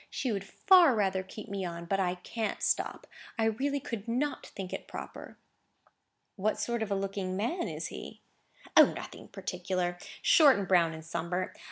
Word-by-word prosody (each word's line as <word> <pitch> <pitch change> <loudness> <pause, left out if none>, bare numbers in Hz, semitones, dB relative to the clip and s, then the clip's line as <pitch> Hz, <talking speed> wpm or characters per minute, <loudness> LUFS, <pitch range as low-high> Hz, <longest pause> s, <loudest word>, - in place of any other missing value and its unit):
She 255 - -2
would 200 -2 -2
far 350 - +5
rather 190 -3 +1
keep 210 +4 -9
me 200 -2 -3
on; 170 -1 -5
but 195 +3 0
I 180 -1 +1
can't 215 +4 -4
stop. - - 0 0.3
I 225 - +2
really 275 +6 0
could 230 -4 -6
not 265 +5 -1
think 190 -2 -7
it - - -5
proper." - - -8 1.0
"What 210 +2 0
sort 235 -1 -1
of 220 - -1
a 200 - +1
looking 195 -1 -2
man 330 - -1
is - - -4
he?" - - -9 0.5
"O, - - +10
nothing - - -8
particular. 180 -2 -3 0.2
Short, 310 - +7
and 200 -2 -2
brown, 170 -3 +4
and 160 0 -10
sunburnt. 170 +3 -2
195 Hz, 175 wpm, -30 LUFS, 185-235 Hz, 1.0 s, O